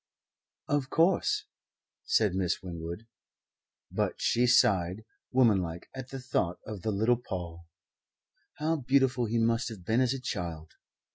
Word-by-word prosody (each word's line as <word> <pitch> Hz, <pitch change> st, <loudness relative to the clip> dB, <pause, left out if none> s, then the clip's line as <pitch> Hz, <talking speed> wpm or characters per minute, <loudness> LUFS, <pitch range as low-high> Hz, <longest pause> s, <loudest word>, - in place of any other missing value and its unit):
"Of 145 Hz, -2 st, 0 dB
course," 170 Hz, +3 st, +2 dB, 0.6 s
said 105 Hz, -4 st, +3 dB
Miss 95 Hz, -1 st, -1 dB
Winwood. 85 Hz, +3 st, -6 dB, 0.9 s
But -, -, -1 dB
she 125 Hz, +1 st, +2 dB
sighed, 100 Hz, -4 st, +3 dB, 0.3 s
womanlike, 95 Hz, -10 st, +2 dB
at 130 Hz, -1 st, -7 dB
the 135 Hz, -, -6 dB
thought 105 Hz, -9 st, -1 dB
of 105 Hz, -4 st, -6 dB
the 110 Hz, -, -2 dB
little 110 Hz, +4 st, +2 dB
Paul 85 Hz, -7 st, -7 dB, 0.9 s
(how 160 Hz, +2 st, 0 dB
beautiful 130 Hz, -2 st, +2 dB
he 115 Hz, +1 st, -1 dB
must 115 Hz, +1 st, +1 dB
have 100 Hz, -6 st, -10 dB
been 115 Hz, +5 st, +2 dB
as 130 Hz, +1 st, +2 dB
a -, -, -5 dB
child!) 85 Hz, -10 st, -5 dB
110 Hz, 135 wpm, -29 LUFS, 90-125 Hz, 0.9 s, said